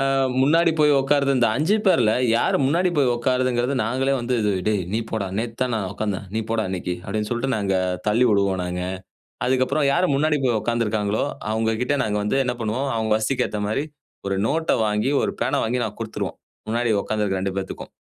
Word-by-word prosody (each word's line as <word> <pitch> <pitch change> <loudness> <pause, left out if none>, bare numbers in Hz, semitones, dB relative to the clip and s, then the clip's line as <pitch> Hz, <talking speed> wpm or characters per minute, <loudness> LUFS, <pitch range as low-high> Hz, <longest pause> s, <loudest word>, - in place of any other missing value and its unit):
அ - - +1 0.4
முன்னாடி 165 +4 +4
போய் 150 -1 +5
உட்காருற 140 0 +2
இந்த 120 - +4
5 170 +8 +2
பேர்ல 110 - +4 0.2
யாரு - - +2
முன்னாடி 170 +6 +2
போய் 130 -4 +3
உட்காருதுங்கிறது. 125 +1 0
நாங்களே 130 +4 0
வந்து 125 +1 -1
இது 105 -1 +1 0.2
"டேய் 105 -3 +1
நீ - - +2
போடா, 110 -3 -2
நேத்து 115 0 -3
தான் 125 - -1
நான் 100 -4 -2
உட்கார்ந்தேன். 100 -1 -3
நீ 110 - +1
போடா 115 -1 0
இன்னைக்கு,"அப்டின்னு 95 +3 -3
சொல்லிட்டு 130 +3 -1
நாங்க 100 -2 0 0.3
தள்ளி 120 +4 +3
விடுவோம் 100 -2 +2
நாங்க. 90 0 -3 0.7
அதுக்கப்பறம் 130 +3 +2
யாரு 180 +1 +2
முன்னாடி 150 +1 +1
போய் 120 -4 +2
உட்கார்ந்துருக்காங்களோ, 110 -3 0 0.3
அவங்க 110 0 0
கிட்ட 145 - 0
நாங்க 105 -1 -1
வந்து 105 +6 0
என்ன 125 0 -1
பண்ணுவோம், 125 +6 -1
அவங்க 110 -1 -1
வசதிக்கேத்த 110 -2 -1
மாரி 135 +7 -1 0.4
ஒரு 95 0 -1
நோட்ட 160 +5 0
வாங்கி, 105 +6 0
ஒரு - - -1
பேனா - - +1
வாங்கி 120 +1 0
நாங்க 105 +1 -7
குடுத்துருவோம். 110 -1 -4 0.3
முன்னாடி 115 +1 +1
உட்கார்ந்து 110 -1 -1
இருக்கற 95 -2 -1
2 95 0 -2
பேத்துக்கும். 95 - -5
115 Hz, 185 wpm, -23 LUFS, 105-135 Hz, 0.7 s, போய்